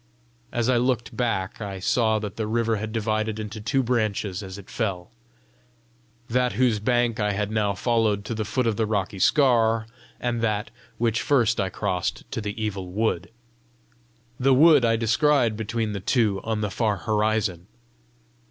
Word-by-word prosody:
As 120 -2 0
I 130 -1 +3
looked 120 -1 0
back 115 -5 -2
I 100 -2 -5
saw 110 +3 +2
that 105 -2 -5
the 110 -1 -3
river 115 0 +1
had 110 +1 -4
divided 110 -1 -1
into 105 0 -6
two 135 +5 +1
branches 110 -5 -1
as 95 -1 -8
it 100 - -12
fell, 95 -6 -3 1.2
that 125 +1 +1
whose 120 -4 +2
bank 120 +1 +1
I 105 -1 +1
had 105 +1 -2
now 105 -2 0
followed 110 -1 +1
to 115 - -3
the 110 -1 -2
foot 125 +5 -1
of 115 -3 0
the 110 -1 +1
rocky 100 -2 -2
scaur, 115 - +3 0.3
and 120 -1 -1
that 110 -2 -1 0.3
which 115 -1 +1
first 120 -6 +2
I 95 -1 0
crossed 90 0 -2
to - - -3
the 105 +1 -5
Evil 100 -4 -3
Wood. 95 -2 -1 1.1
The 135 +1 +4
wood 155 -1 +6
I 115 -1 +3
descried 120 +1 +2
between 110 0 -2
the 100 - -3
two 105 -1 +1
on 110 -1 -2
the 105 -2 -2
far 105 -2 0
horizon. 105 -4 0
110 Hz, 170 wpm, -25 LUFS, 105-120 Hz, 1.2 s, wood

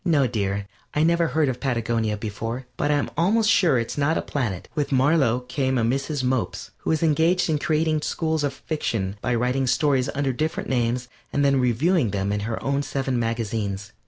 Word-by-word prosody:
No, 150 -6 +3
dear, 100 -4 -1 0.3
I 150 - +3
never 170 0 +3
heard 155 +1 +1
of 125 -1 -2
Patagonia 115 -4 0
before, 115 +4 -4
but 145 - -1
I'm 145 -1 +1
almost 215 +7 +3
sure 170 - +4
it's 115 +4 -2
not 155 +3 +2
a - - 0
planet. 110 -11 -3
With 145 -1 -2
Marlow 135 -2 +3
came 130 +1 -1
a 115 - +1
Mrs. 135 +4 -1
Mopes, 130 -2 -1
who - - -4
is 160 0 +1
engaged 165 +3 +3
in 150 - +1
creating 155 0 +1
schools 160 -1 -1
of 145 - +1
fiction 115 -9 -3
by 120 - 0
writing 125 +3 0
stories 135 -1 +2
under 140 -2 0
different 155 +5 -2
names 125 0 0 0.2
and 145 0 +1
then 140 -1 +3
reviewing 130 - +2
them 100 0 -1
in 105 - 0
her 110 - -2
own 140 +1 +1
seven 135 -3 -2
magazines. 110 -3 -2
130 Hz, 190 wpm, -24 LUFS, 115-150 Hz, 0.3 s, sure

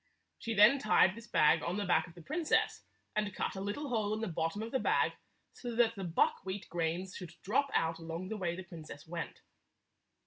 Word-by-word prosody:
She 225 -1 -3
then 215 +7 +7
tied 210 -5 +5
this 230 +2 -11
bag 150 -7 +4
on 180 - -2
the 205 - -1
back 180 - +3
of 165 - -15
the 170 - -12
princess, 315 - +1 0.3
and 210 -2 -1
cut - - -2
a 190 - -4
little 210 +9 -3
hole 215 -3 0
in - - -4
the 225 - -1
bottom 165 +4 -2
of 225 - -6
the 265 - +1
bag - - +2 0.4
so 240 -2 -6
that 230 -1 +4
the 195 -3 -6
buckwheat 190 +3 0
grains 175 +3 -2
should 170 -3 -8
drop 265 +8 +1
out 165 0 +1
along 165 +3 -5
the 220 - -3
way 175 -3 -1
the 185 - -6
princess 155 -4 -10
went. 170 0 -5
190 Hz, 210 wpm, -33 LUFS, 170-225 Hz, 0.4 s, then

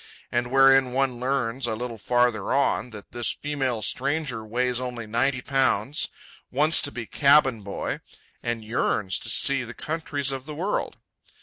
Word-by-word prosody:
and 120 0 -1
wherein 135 -1 +5
one 130 -2 0
learns, 125 -1 -1
a 110 - -1
little 115 0 -6
farther 120 -1 +1
on, 135 -2 +1
that 105 -3 -12
this 120 -1 -2
female 135 -6 -2
stranger 135 +1 0
weighs 125 +3 -1
only 125 -2 -5
ninety 125 +4 0
pounds, 135 0 +1 0.4
wants 150 +5 +4
to 145 - -2
be 120 -4 -6
cabin 140 -3 +3
boy, 100 0 -4 0.4
and 120 -2 -3
"yearns 105 -5 0
to - - -2
see 140 -1 +5
the 120 0 -9
countries 150 -3 -1
of 135 -1 -5
the 150 - -6
world." 185 +7 -2
125 Hz, 155 wpm, -25 LUFS, 115-135 Hz, 0.4 s, wherein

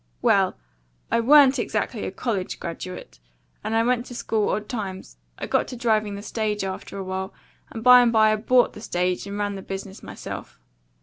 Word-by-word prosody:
Well, - - +3 0.5
I - - +3
WA'N'T 275 +2 +6
exactly 235 -1 -2
a - - -4
college 195 -2 -3
graduate, 170 - -7 0.4
and 220 - -2
I 225 - +3
went 245 0 0
to 245 - -9
school 220 -3 0
odd 210 0 -2
times. 190 - -6 0.2
I - - -4
got - - +1
to - - -7
driving 215 -4 0
the 200 - -8
stage 210 -1 -2
after 195 +1 -5
while, 190 +1 -5 0.3
and 225 - -7
by 250 0 +9
and 240 -1 +3
by 215 -1 +5
I - - 0
BOUGHT 245 +3 +3
the 210 - -10
stage 180 -1 -1
and 200 +1 -5
run 205 0 -1
the 195 - -6
business 195 0 -7
myself. - - -8
210 Hz, 190 wpm, -24 LUFS, 195-235 Hz, 0.5 s, by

